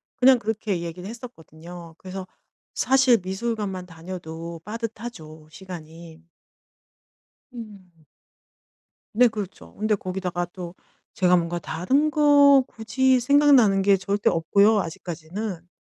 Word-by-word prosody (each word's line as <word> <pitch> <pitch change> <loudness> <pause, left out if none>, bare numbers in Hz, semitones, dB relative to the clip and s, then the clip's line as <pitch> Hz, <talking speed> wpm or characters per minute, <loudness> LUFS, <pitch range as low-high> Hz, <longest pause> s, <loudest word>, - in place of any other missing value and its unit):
그냥 255 -1 +5
그렇게 210 -3 -2
얘기를 175 +3 -7
했었거든요. 170 -8 -11
그래서 190 +1 -8 0.5
사실 260 -2 +4
미술관만 190 -1 -4
다녀도 165 -1 -8
빠듯하죠, 210 -8 -8
시간이. 165 -2 -11 1.3
음. 200 -8 -12 1.1
네. 245 +3 +5
그렇죠. 210 -4 -6
근데 215 +1 0
거기다가 185 -2 -3
또 175 -1 -8 0.4
제가 180 -1 +3
뭔가 170 0 -1
다른 260 - 0
거 285 -2 +6
굳이 260 +3 +1
생각나는 250 -6 +4
게 200 0 +4
절대 200 +2 0
없고요, 200 +6 +3
아직까지는. 175 +1 -6
190 Hz, 260 characters per minute, -24 LUFS, 170-230 Hz, 1.3 s, 거